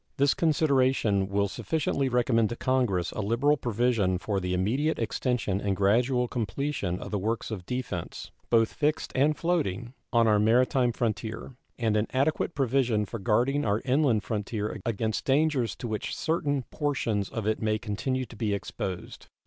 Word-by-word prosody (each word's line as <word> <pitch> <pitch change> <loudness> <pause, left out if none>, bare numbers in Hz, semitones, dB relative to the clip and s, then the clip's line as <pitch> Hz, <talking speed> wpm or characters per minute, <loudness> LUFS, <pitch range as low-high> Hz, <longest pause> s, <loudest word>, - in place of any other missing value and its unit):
This 140 +1 +4
consideration 130 - +2
will 100 0 +1
sufficiently 140 - -1
recommend 120 -3 +2
to 120 - -4
Congress 120 -10 0
a - - -3
liberal 115 +8 +2
provision 115 -7 +1
for 100 +1 -2
the 90 -1 -3
immediate 130 - 0
extension 115 -3 -1
and 100 -1 0
gradual 120 +6 +2
completion 115 -4 -2
of - - -7
the 105 - 0
works 110 +4 -2
of 95 -5 -6
defense, 125 -9 -4 0.2
both 115 -1 +3
fixed 150 0 0
and 145 +3 +2
floating, 125 - -1 0.2
on 115 -1 +4
our 105 -1 +4
maritime 125 +3 +3
frontier, 115 +1 -3 0.2
and 110 -3 +1
an 105 +1 +1
adequate 150 +5 0
provision 125 -5 +1
for 115 +3 -6
guarding 125 +8 +1
our 105 +1 0
inland 130 -5 +2
frontier 105 -1 -3
against 110 -1 -1
dangers 140 -3 +2
to 120 - -6
which 110 -2 -3
certain 145 -4 0
portions 120 -9 -1
of 115 -3 -4
it 110 0 0
may 110 -1 +1
continue 125 +5 -2
to 120 - -13
be 105 -2 0
exposed. 95 -2 -6
115 Hz, 160 wpm, -27 LUFS, 105-135 Hz, 0.2 s, This